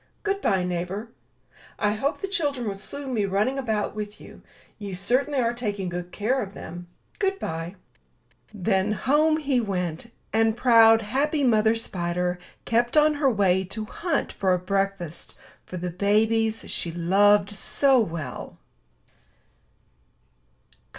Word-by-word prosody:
Good 400 -1 -1
bye, 190 -2 +2
neighbor. 180 +5 -3 0.7
I 210 - +1
hope 270 +8 -2
the 390 - -2
children 290 - -1
will 200 - -1
soon 265 +7 -6
be 210 -4 +1
running 210 +8 0
about 220 -5 -1
with 210 -1 -6
you. - - -13 0.4
You 200 -3 -5
certainly 255 +9 +1
are 235 -1 +1
taking 205 -6 -3
good 175 0 -5
care 250 +6 0
of 200 -1 -7
them. 175 +2 -8 0.3
Good 390 -1 +1
bye." 165 - -5 0.8
Then 200 0 0
home 300 +8 +2
he 275 -5 +1
went; 180 0 -3 0.2
and 225 0 +2
proud, 225 -2 +6
happy 285 +7 0
Mother 220 -2 +4
Spider 180 -4 -2 0.3
kept 240 +4 +1
on 305 0 +5
her 285 -2 +2
way 190 -5 +2
to 215 +4 -4
hunt 340 +9 -2
for 190 -2 +2
a - - 0
breakfast 195 -2 -3 0.3
for 185 - -6
the 180 0 -4
babies 220 +4 +1
she 170 - -3
loved 200 +4 +3
so 265 +6 +3
well. 160 - -4
210 Hz, 140 wpm, -25 LUFS, 185-250 Hz, 0.8 s, proud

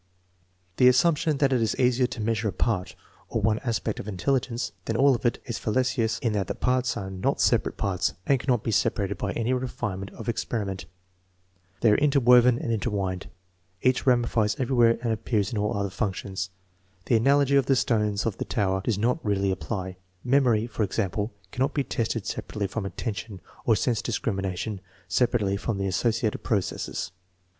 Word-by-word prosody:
The 125 - +6
assumption 150 +3 +3
that 135 -1 +2
it 125 - +2
is 110 - +1
easier 125 0 +3
to 120 - -7
measure 110 0 0
a - - 0
part, 95 0 -1 0.3
or - - -1
one 110 +1 +2
aspect, 115 -3 -2
of - - -6
intelligence 120 +4 -1
than 115 - -2
all 140 +1 +5
of 120 0 0
it, 120 - -1
is 120 -3 -4
fallacious 115 -1 0
in 115 -3 +1
that 100 -3 -1
the - - -3
parts 125 -1 0
are 95 -1 -5
not 95 -1 -1
separate - - +2
parts 95 -2 -1
and 135 -2 +3
cannot 120 -4 0
be 115 - -1
separated 100 -2 0
by 100 - -1
any 115 +2 0
refinement 110 -6 -3
of - - -9
experiment. 105 -4 -2 1.0
They 115 - +5
are 105 - +4
interwoven 125 -4 +5
and 115 - -3
intertwined. 100 -5 -2 0.5
Each 130 +1 +2
ramifies 120 -4 +2
everywhere 120 -3 +3
and 115 -2 +1
appears 105 -2 -1
in 110 - -1
all 105 0 0
other 100 -1 -2
functions. 95 -2 -3 0.6
The 120 - +2
analogy 140 +3 +3
of 135 -2 +3
the 135 - +4
stones 105 -4 +1
of 110 -4 -2
the - - -2
tower 95 -4 0
does 110 -2 0
not 125 +9 0
really 100 -2 +1
apply. 95 -1 -4 0.3
Memory, 125 -4 +3
for 115 -1 -5
example, 105 +1 -1 0.2
cannot 135 +3 -1
be 140 - +2
tested 115 -4 -2
separately 105 -2 -3
from 100 +1 -3
attention, 105 -1 -5 0.3
or 115 - +4
sense 115 +2 0
discrimination 100 -3 -2 0.3
sepa 120 +6 +2
rately 100 -1 0
from 110 -2 -2
the 95 - -1
associative 110 +3 0
processes. 100 -8 -2
115 Hz, 180 wpm, -26 LUFS, 100-125 Hz, 1.0 s, The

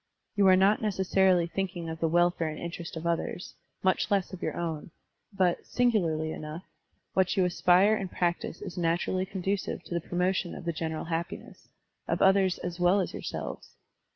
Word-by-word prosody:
You 200 -2 +4
are 185 - +8
not 195 +3 +4
neces 195 -3 -2
sarily 185 -3 +5
thinking 180 -2 -3
of 160 0 -5
the 165 - +1
welfare 175 0 +2
and 155 - -5
interest 170 0 -6
of 160 - -6
others, 170 +1 -2 0.3
much 190 -1 +2
less 195 -2 0
of 185 - -7
your - - -3
own; 165 -3 -3 0.4
but, 185 -3 +1
singularly 170 -11 +1
enough, 155 +4 -6 0.5
what 190 0 +2
you 185 - +4
aspire 180 +3 +4
and 195 -4 -2
practise 175 -2 -2
is 175 - -6
naturally 175 +2 0
conducive 190 +1 -2
to - - -7
the 170 - 0
promotion 180 +1 -1
of - - -9
the 170 - -1
general 160 -1 -3
happi 165 +1 -3
ness, - - -17 0.4
of - - 0
others 190 -1 +4
as 175 0 -5
well 180 +3 +4
as 190 - -1
of - - -18
yourselves. - - -6
180 Hz, 185 wpm, -29 LUFS, 170-190 Hz, 0.5 s, are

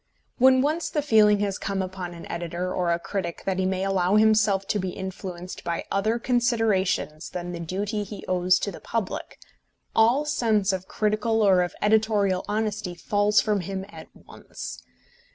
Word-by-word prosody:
When 260 +1 +6
once 310 +4 0
the 295 - -1
feeling 210 -6 +5
has 200 -1 -1
come 195 -1 -2
upon 185 -2 -6
an 170 - -9
editor 175 +1 -4
or 175 -2 0
a 170 - +2
critic 175 -1 -4
that 190 -1 -1
he 185 - +1
may 190 0 -1
allow 195 0 +1
himself 215 -2 +3
to 210 - +1
be 185 -1 -2
influenced 185 -1 -7
by 170 -1 -3
other 215 +4 +1
considerations 225 -10 0
than 175 0 -5
the 175 - -6
duty 200 +5 -3
he 205 -1 -9
owes 180 0 +3
to 200 - -2
the - - -10
public, 225 -5 -4 0.6
all 235 +7 +4
sense 215 -8 +1
of 190 0 -4
critical 215 +1 0
or 190 -3 +5
of 175 -1 -2
editorial 210 -3 +2
honesty 210 -4 -2
falls 205 +3 +2
from 210 -2 0
him 190 +1 -4
at - - -11
once. - - -9
195 Hz, 170 wpm, -25 LUFS, 185-215 Hz, 0.6 s, When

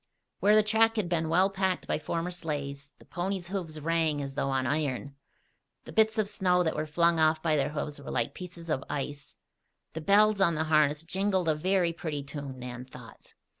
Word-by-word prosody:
Where 210 +1 +5
the 215 - +6
track 225 +1 +3
had 215 -5 0
been 165 -2 0
well 185 +4 +3
packed 190 -2 -1
by - - -1
former 165 +3 -3
sleighs, 145 -5 -5
the - - -19
ponies' 180 0 -3
hoofs 175 -5 -4
rang 160 -1 0
as 140 -1 -4
though 135 - -1
on 135 -1 0
iron. 140 0 -1 0.7
The - - -9
bits 220 0 +3
of 215 -2 +1
snow 180 -3 +2
that 160 - -1
were 155 +1 -2
flung 170 +2 +2
off 155 0 +3
by 160 -2 +2
their 140 - +1
hoofs 150 -1 -4
were 140 - -9
like - - -1
pieces 170 -2 -8
of 135 -3 -1
ice. 145 0 -5 0.6
The 160 - -5
bells 205 +3 +4
on 170 -3 +4
the 155 - 0
harness 155 -1 +2
jingled 190 +1 0
a 160 - +4
very 175 +2 +1
pretty 150 -4 -4
tune, 140 -2 -7
Nan 125 0 -7
thought. 125 -3 -14
160 Hz, 205 wpm, -29 LUFS, 145-185 Hz, 0.7 s, the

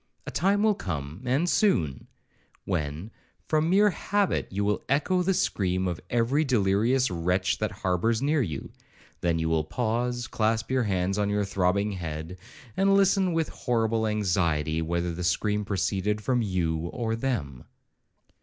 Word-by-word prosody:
A - - -5
time 200 +5 +2
will 215 -1 +4
come, 80 - -5
and 135 +8 +1
soon, 85 - +1 0.6
when, 80 +2 -3 0.3
from 155 +1 +1
mere 205 +3 +5
habit, 205 +1 0
you 100 +1 -2
will 105 0 0
echo 150 +7 +2
the 190 +1 +1
scream 95 - 0
of 85 -2 -3
every 120 +6 +2
delirious 120 +1 +2
wretch 90 +3 0
that 110 - 0
harbours 95 +5 0
near 145 +2 +1
you; 80 - -4 0.5
then 85 -1 +1
you 80 0 -1
will 80 -1 +1
pause, 120 +6 -1
clasp 110 +2 -1
your 130 -2 +2
hands 95 0 0
on 100 0 +1
your 105 0 0
throbbing 100 +2 +1
head, 85 -1 -6 0.4
and 195 0 +3
listen 195 -1 +3
with 165 -1 0
horrible 115 -2 0
anxiety 85 -7 0
whether 85 +1 -1
the 90 +2 -5
scream 105 +4 0
proceeded 100 +1 -1
from 125 +3 0
you 85 -5 -1
or 115 +3 -2
them. 95 - -3
105 Hz, 155 wpm, -27 LUFS, 90-130 Hz, 0.6 s, mere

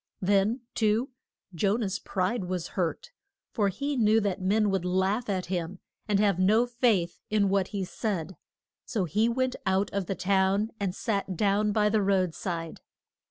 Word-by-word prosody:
Then, 200 +5 +2
too, 220 +3 +1 0.4
Jo 195 +4 +1
nah's 210 -3 -2
pride 190 +2 -1
was 180 -2 -3
hurt, 185 - -3 0.4
for 205 -4 +1
he 280 +8 -3
knew 220 -2 +4
that 200 -2 -2
men 205 +2 +2
would 190 -2 0
laugh 190 +5 0
at 185 -2 -1
him, 175 0 -3 0.3
and 205 -2 +2
have 200 -3 +2
no 215 +6 +4
faith 235 -8 +1
in 210 -2 +2
what 195 -1 +1
he 200 -3 -3
said, 190 -2 -3 0.5
so 210 -6 -2
he 215 +8 +1
went 255 +1 0
out 190 +1 +1
of 195 -3 -2
the 195 - -2
town 195 +3 +1
and 195 -2 -2
sat 200 -5 -2
down 210 +1 +2
by 210 0 +2
the 210 0 +2
road 190 -3 +1
side. 165 -3 -5
200 Hz, 170 wpm, -28 LUFS, 185-215 Hz, 0.5 s, knew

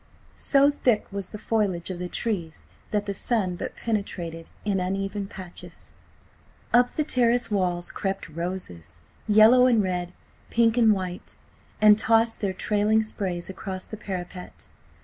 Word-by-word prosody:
So 280 0 +4
thick 245 -6 +1
was 200 -2 -4
the 210 - -7
foliage 200 -5 -1
of 175 - -6
the 180 0 -4
trees 175 -9 -3 0.2
that 205 -1 -1
the 200 - -2
sun 195 -3 0
but - - -5
penetrated 175 -7 -3 0.2
in 200 -2 +1
uneven 195 +2 -2
patches. 185 -3 -9 0.8
Up 245 +1 +5
the 305 - +1
terrace 240 -4 +2
walls 180 -3 0
crept 195 -1 -3
roses, 165 - -6 0.3
yellow 220 +4 +7
and 230 -4 +4
red, 180 -1 -2 0.4
pink 230 -1 +3
and 230 -3 +5
white, 185 -3 -3 0.4
and 210 0 +7
tossed 225 0 +3
their 200 -2 0
trailing 210 +3 +2
sprays 185 -5 -4
across 190 -1 -6
the - - -7
parapet. 180 -3 -6
200 Hz, 145 wpm, -25 LUFS, 180-225 Hz, 0.8 s, yellow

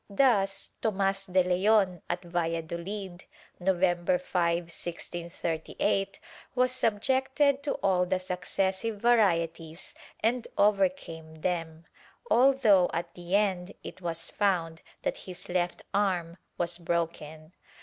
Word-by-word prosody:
Thus 200 -3 +2
Tomas 195 -2 0
de 185 0 +3
Leon, 185 0 +3
at 175 +1 -2
Valla 165 -1 -1
doUd, 180 +2 -6 0.4
November 180 -1 +2
5, 175 -1 +1
1638, 170 +2 -3 0.4
was 255 0 +3
subjected 265 +4 +2
to 285 - -1
all 180 -2 +3
the 185 +1 +1
successive 190 +3 -2
varieties 170 -8 +1 0.3
and 235 +2 +1
overcame 180 -6 +1
them, 165 -2 -2 0.5
although 240 -8 +5
at 170 0 -3
the 175 +2 -2
end 195 -3 +1
it - - -9
was 170 -2 -4
found 170 -5 0 0.2
that - - -1
his 180 - -7
left 175 -1 -1
arm 180 -4 0 0.2
was 170 0 -2
broken. 165 -2 -3
180 Hz, 110 wpm, -29 LUFS, 170-200 Hz, 0.5 s, although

